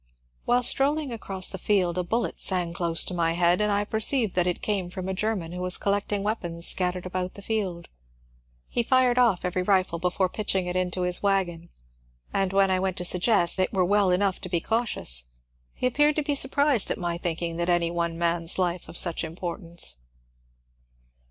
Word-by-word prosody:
While 245 +1 +2
strolling 285 +2 +2
across 195 -4 -1
the 190 - -4
field 180 -3 +1
a 180 - -1
ballet 230 +7 -1
sang 180 -3 0
close 170 -1 0
to - - -5
my 165 -2 +1
head, 175 +3 +2
and 210 0 +1
I 205 0 +1
perceived 220 +1 +1
that 180 -1 +1
it 180 - -2
came 195 -4 -1
from 185 0 -6
a 190 - -2
German 190 -4 -2
who 180 +1 -6
was 180 -1 +1
collecting 200 0 -1
weapons 175 -6 -2
scattered 180 -1 0
about 185 0 -4
the 200 - -11
field. 190 -6 -3 0.8
He 240 - 0
fired 250 0 +3
off 225 -9 +2
every 180 0 -1
rifle 185 -3 +1
before 180 +2 0
pitching 190 -1 -2
it 180 0 -4
into 180 0 -1
his 180 0 0
wagon, 180 -4 -1 0.6
and 195 -1 0
when 195 0 +3
I 185 - +2
went 190 -1 -2
to - - -2
suggest 180 0 +3
that 185 - +3
it - - -12
were 185 -2 +2
well 200 +1 +2
enough 185 +1 0
to 185 - -6
be 170 -1 0
cautious, 185 - -1 0.5
he - - -3
appeared 295 +4 +3
to 305 - 0
be 290 - -1
surprised 280 -3 +3
at - - -1
my 170 -1 -3
thinking 170 -1 -3
any 170 -1 +1
one 170 -1 -2
man's 170 0 +2
life 180 -1 -2
of 170 - -7
such 170 -2 +2
importance. 170 - -2
185 Hz, 195 wpm, -25 LUFS, 175-205 Hz, 0.8 s, fired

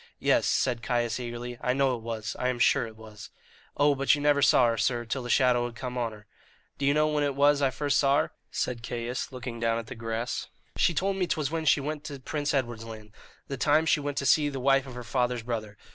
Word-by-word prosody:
"Yes," - - +2
said 120 -2 +1
Caius 120 0 -1
eagerly, 120 0 -6
"I 125 - +1
know 135 -1 +2
it 115 - -8
was 110 -1 -4
I 125 - 0
am 125 -1 0
sure 120 +1 +3
it 110 - -12
was." 105 -2 -11 0.5
"Oh, 145 0 +4
but 140 +1 +3
you - - -5
never 145 -1 +3
saw 135 - +5
her, 115 - 0
sir, 120 +1 0
till 130 +4 -3
the 120 - -7
shadow 125 -2 +3
had 120 - -10
come 125 +1 -5
on 120 -2 -1
her." 105 -1 -14 0.5
"Do 140 - 0
you 140 - +4
know 155 0 +3
when 150 -1 0
it 140 -2 -1
was 145 +1 +4
I 135 - +3
first 140 +3 0
saw 140 0 +4
her?" - - -5 0.2
said 120 -2 -3
Caius, 120 +2 -4
looking 125 -2 -6
down 115 0 +1
at 115 - -4
the 120 - -8
grass. 115 0 -4 0.3
"She 170 - +2
told 195 +4 0
me 185 -2 0
'twas 155 -3 -1
when 165 -1 -2
she 145 - +4
went 150 +1 -4
to 145 -3 -6
Prince 145 +2 -2
Edward's 120 -5 -1
Land, 110 -2 -10 0.4
the 135 - -4
time 150 +4 +3
she 160 - +3
went 145 -1 -4
to 140 - -1
see 145 +3 +4
the 135 -2 -5
wife 135 +1 +3
of 130 - -9
her 125 - -6
father's 125 -1 -1
brother. 110 -3 -4
125 Hz, 250 wpm, -28 LUFS, 115-145 Hz, 0.5 s, saw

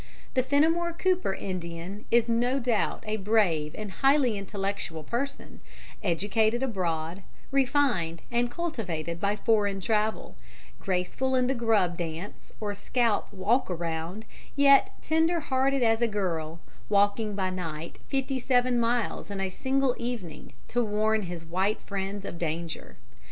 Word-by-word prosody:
The 255 - +3
Fenimore 320 +6 +2
Cooper 365 - +1
Indian 180 +2 -5
is 235 0 +4
no 240 +3 +2
doubt 240 -4 0
a 215 0 -1
brave 190 -8 +2
and 215 -2 -5
highly 270 -1 +3
intellectual 195 -5 -3
person, 260 - -4 0.4
educated 215 +7 +1
abroad, 175 -6 -2 0.3
refined 250 - +1
and 240 0 +1
cultivated 180 - -3
by 200 +2 +1
foreign 205 -3 +2
travel, 215 +2 0 0.4
graceful 195 +8 0
in 255 -1 +3
the 260 - +1
grub 215 -8 +2
dance 170 +3 -6
or 210 -1 -2
scalp 230 +1 0
walk 205 +6 +1
around, 170 +4 -3 0.3
yet 280 -1 +6
tender 325 +2 +2
hearted 270 -2 +1
as 225 0 +3
a 235 - +4
girl, 170 -6 -2 0.3
walking 205 +1 +2
by 190 -2 0
night 165 -3 -5
fifty 270 -1 -1
seven 250 -1 +2
miles 235 -2 0
in 200 -1 -4
a 190 -1 -1
single 265 +4 +1
evening 235 -9 -5 0.2
to 240 0 +1
warn 215 0 +1
his 170 -2 -6
white 190 +5 0
friends 200 0 -4
of 170 - -6
danger. 165 - -4
210 Hz, 135 wpm, -28 LUFS, 180-245 Hz, 0.4 s, yet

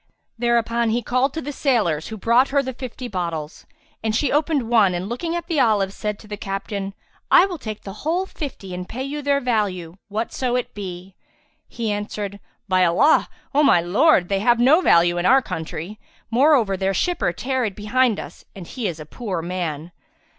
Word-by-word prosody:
'' - - -50
Thereupon 235 -1 +1
he 235 +2 0
called 255 +4 +1
to 320 - -3
the 290 - -4
sailors, 215 - 0
who 220 - -6
brought 235 +6 +3
her 280 0 +2
the 260 0 -4
fifty 255 0 -7
bottles; 170 -6 -5 0.4
and 220 -1 0
she 285 - +1
opened 295 -4 +1
one 215 -6 +4
and, 180 +2 -3
looking 295 +9 -3
at 340 -1 -3
the 330 -4 -1
olives, 205 -5 +2
said 210 0 -3
to 215 - -15
the 210 0 -6
captain, 195 0 -4 0.3
"I 360 - +7
will 360 -4 -5
take 215 -4 -6
the 195 - -7
whole 345 +5 0
fifty 260 - -7
and 180 0 -6
pay 260 +3 -4
you 290 +2 -4
their 280 0 +2
value, 195 -9 -1
whatso 235 +4 -2
it 250 - -2
be." 185 -2 -7 0.5
He 225 -2 -3
answered, 205 -1 -4 0.3
"By 185 -1 +3
Allah, 180 - +4 0.2
O 290 - +4
my 280 -11 +5
lord, 190 - +3
they 195 0 0
have 235 +3 +3
no 280 +9 +5
value 175 - +4
in 175 - +1
our 265 +2 +7
country; 165 +4 -6 0.3
moreover 245 -5 +4
their 190 +1 -1
shipper 355 - 0
tarried 245 +1 -2
behind 230 +2 +1
us, - - -9
and 190 -3 -8
he 235 +4 -4
is 165 -3 -5
a 155 - -8
poor 185 -1 -4
man." 170 -2 -4
220 Hz, 195 wpm, -22 LUFS, 190-260 Hz, 0.5 s, I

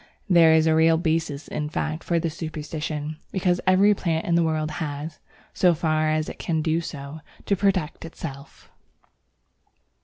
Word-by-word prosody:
There 170 -4 +6
is 160 0 +4
a 160 - +4
real 160 +1 +4
basis 160 -3 -1
in 150 0 -3
fact 155 +1 -3
for 170 - 0
this 165 -1 -3
superstition, 155 -1 -5
because 180 -2 +1
every 195 +3 +5
plant 165 -4 -1
in 170 - 0
the 170 - +4
world 155 -1 0
has, 150 +1 -5 0.3
so 180 -2 +3
far 155 -1 +1
as 155 0 0
it - - -8
can 160 -2 -1
do 160 +1 +1
so, 145 -1 -7 0.3
to 200 - +2
protect 185 -5 0
itself. 145 -4 -9
160 Hz, 160 wpm, -24 LUFS, 155-170 Hz, 0.3 s, There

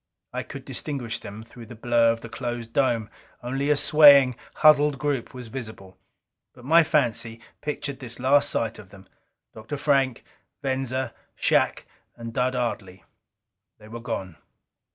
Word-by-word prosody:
I - - -2
could - - -10
distinguish 120 -6 -4
them 105 +1 -9
through 115 0 -13
the 120 - -10
blur 115 0 +3
of 115 0 -4
the - - -8
closed 120 -1 -5
dome 120 -6 +1 0.4
only 135 +4 -2
a 150 - +4
swaying, 140 -4 +7 0.2
huddled 150 -2 +5
group 140 -4 -2
was 125 -2 -9
visible. 110 -7 -8 0.6
But 125 -1 -15
my 165 +4 +6
fancy 120 -7 0 0.2
pictured 145 -2 -4
this 120 -2 -6
last 140 +3 +3
sight 115 -4 -2
of 100 - -13
them, 95 0 -16 0.5
Dr. 115 +6 -7
Frank, 135 -4 +1 0.4
Venza, 130 -2 -2 0.2
Shac - - +1 0.3
and 115 -1 -8
Dud 130 +1 0
Ardley. 100 -6 -4 0.7
They 105 0 -15
were 120 +1 -7
gone. 95 -8 -5
125 Hz, 150 wpm, -25 LUFS, 115-140 Hz, 0.7 s, swaying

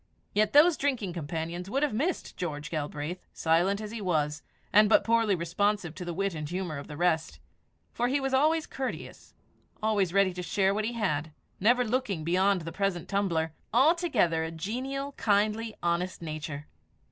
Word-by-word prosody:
Yet 210 0 +2
those 310 +3 +7
drinking 250 -10 -1
companions 170 +3 -4
would 275 +7 0
have 295 - +1
missed 310 +11 -2
George 150 -4 -4
Galbraith, 155 +3 -4
silent 175 +5 +2
as 215 -1 -6
he 230 -1 -5
was, 150 -5 0 0.3
and 210 0 +7
but - - +5
poorly 230 -3 +3
responsive 175 +1 0
to 180 - -7
the 175 - -4
wit 195 0 0
and 150 -2 -5
humour 175 -4 -3
of 140 - -9
the 150 - -8
rest; 170 -1 0 0.5
for 240 - 0
he 275 +3 +1
was 270 -1 -2
always 310 +4 +3
courteous, 265 -1 -6 0.5
always 205 -5 +2
ready 195 -1 +3
to 180 - -5
share 190 +2 +1
what 210 +1 -1
he 235 - -2
had, 160 -9 -1 0.3
never 245 +5 +4
looking 220 -8 -1
beyond 185 +3 +2
the 165 +1 -6
present 195 -1 -1
tumbler 170 -6 0 0.2
altogether 255 - +3
a 160 - -3
genial, 260 - -4
kindly, 215 +1 +1
honest 175 +2 0
nature. 155 -2 -5
195 Hz, 170 wpm, -29 LUFS, 165-225 Hz, 0.5 s, those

